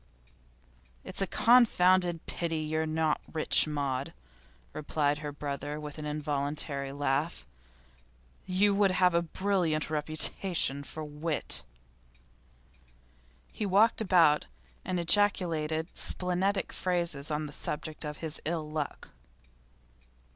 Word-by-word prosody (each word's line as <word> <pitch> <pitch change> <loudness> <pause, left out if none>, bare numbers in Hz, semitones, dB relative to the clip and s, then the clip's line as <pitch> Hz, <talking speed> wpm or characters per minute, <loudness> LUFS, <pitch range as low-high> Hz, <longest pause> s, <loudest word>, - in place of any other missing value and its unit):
'It's - - -4
a 195 - 0
confounded 185 -8 +3
pity 165 -2 -3
that - - -6
you're 160 0 0
not 155 -1 0
rich, 155 0 +4
Maud,' 140 0 -3 0.6
replied 145 -1 -1
her 150 -1 -5
brother 145 +1 -5
with 150 0 -8
an 150 - -5
involuntary 145 -1 -2
laugh. 145 +3 -2 1.0
'You 200 +2 +3
would 200 0 +3
have 185 -1 +3
a 170 - +3
brilliant 170 -3 -1
reputation 155 0 +2
for 155 +2 -7
wit.' 150 +1 -2 1.9
He - - -5
walked 210 +4 +3
about 170 -7 +4 0.4
and 185 -1 -2
ejaculated 165 -4 +1
splenetic 190 +2 +1
phrases 170 -6 -1
on 150 0 -2
the 145 - -8
subject 150 +2 -4
of 150 -1 -5
his 155 -1 -2
ill 160 -1 -3
luck. 150 -1 -5
155 Hz, 110 wpm, -29 LUFS, 150-180 Hz, 1.9 s, rich